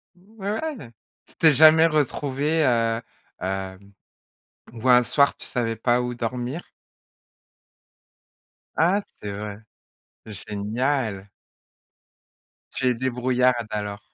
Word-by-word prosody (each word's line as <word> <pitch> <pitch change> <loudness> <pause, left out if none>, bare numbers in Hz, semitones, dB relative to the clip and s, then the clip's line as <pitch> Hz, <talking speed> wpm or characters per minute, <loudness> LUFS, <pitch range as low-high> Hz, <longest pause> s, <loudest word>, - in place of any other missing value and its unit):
Ouais! 210 - -6 0.3
Tu - - -12
t'es 160 -2 +5
jamais 160 +3 +7
retrouvée, 150 0 0
heu, 115 -2 +1 0.4
hem, 95 +1 -5 0.8
où 120 +2 -2
un 125 0 +7
soir 140 +3 +2
tu - - -9
savais 115 -3 -2
pas 120 +2 +1
où 125 0 -3
dormir? 125 +6 -4 2.1
Ah 180 +6 +2 0.2
c'est 105 - -5
vrai. 105 0 -6 0.7
Génial. 105 +1 -3 1.4
Tu 130 - -1
es 125 - +2
débrouillarde 125 -1 0
alors. 105 -1 -4
125 Hz, 100 wpm, -24 LUFS, 110-145 Hz, 2.1 s, jamais